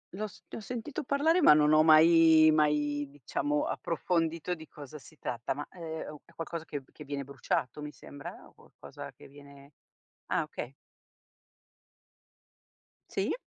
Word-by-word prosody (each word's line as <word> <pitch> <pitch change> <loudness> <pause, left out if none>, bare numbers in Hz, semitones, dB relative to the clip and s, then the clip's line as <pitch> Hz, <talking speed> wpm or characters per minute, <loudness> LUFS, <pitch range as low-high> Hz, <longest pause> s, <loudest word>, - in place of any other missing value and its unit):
L'ho 215 +2 -3
s - - -17
ne - - -7
ho - - -10
sentito 250 +7 -5
parlare 300 +6 +2
ma 285 - +8
non 150 0 +4
ho 155 - +7
mai 160 0 +7
mai 150 -1 +1
diciamo 145 +1 -2
approfondito 165 +1 -1
di 160 -2 -9
cosa 150 +1 -10
si 155 +3 -17
tratta, 120 +1 -3
ma, 145 +1 -6
ehm, 160 -3 -6
è 170 - -23
qualcosa 165 0 -5
che 145 -3 -6 0.2
viene 140 -1 -4
bruciato 135 +1 -2
mi 150 0 -6
sembra, 145 -1 -10
o - - -22
qualcosa - - -11
che - - -16
viene 140 0 -15 0.6
ah - - +1
okay. 120 - -6 2.4
Sì? - - -1
155 Hz, 145 wpm, -30 LUFS, 145-165 Hz, 2.4 s, ma